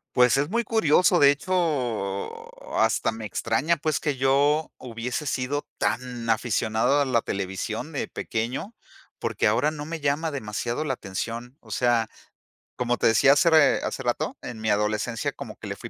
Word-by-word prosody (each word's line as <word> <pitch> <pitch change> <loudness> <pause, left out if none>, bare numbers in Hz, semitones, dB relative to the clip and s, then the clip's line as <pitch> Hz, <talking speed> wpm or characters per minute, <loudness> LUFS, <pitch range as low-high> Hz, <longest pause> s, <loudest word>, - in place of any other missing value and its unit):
Pues 125 +1 +5
es 145 +3 0
muy 235 +3 0
curioso, 180 -5 +3
de 140 - +7
hecho, 140 - -2
hasta 110 0 +2
me 110 -1 -7
extraña, 110 - 0
pues, 155 0 -1
que 145 -2 -1
yo 140 +4 +2
hubiese 120 +3 -4
sido 140 +1 -2
tan 120 -1 -2
aficionado 115 +4 +2
a - - +4
la 125 -3 +2
televisión 95 -3 -4
de - - -3
pequeño, 120 - -4 0.5
porque - - -1
ahora 115 +8 +3
no 150 -1 -6
me 165 +1 -5
llama 150 +2 0
demasiado 120 +2 -3
la 135 - 0
atención. 115 +4 -5
O - - -19
sea, 120 -2 +2 0.7
como 120 0 0
te - - +2
decía 115 +4 +5
hacer, 160 +4 +4
eh, 155 -2 +5
hace - - -4
rato, - - -2
en 115 - -7
mi 110 0 -1
adolescencia 105 +2 0
como - - -9
que - - -10
le - - -5
fui - - -8
125 Hz, 170 wpm, -25 LUFS, 115-150 Hz, 0.7 s, de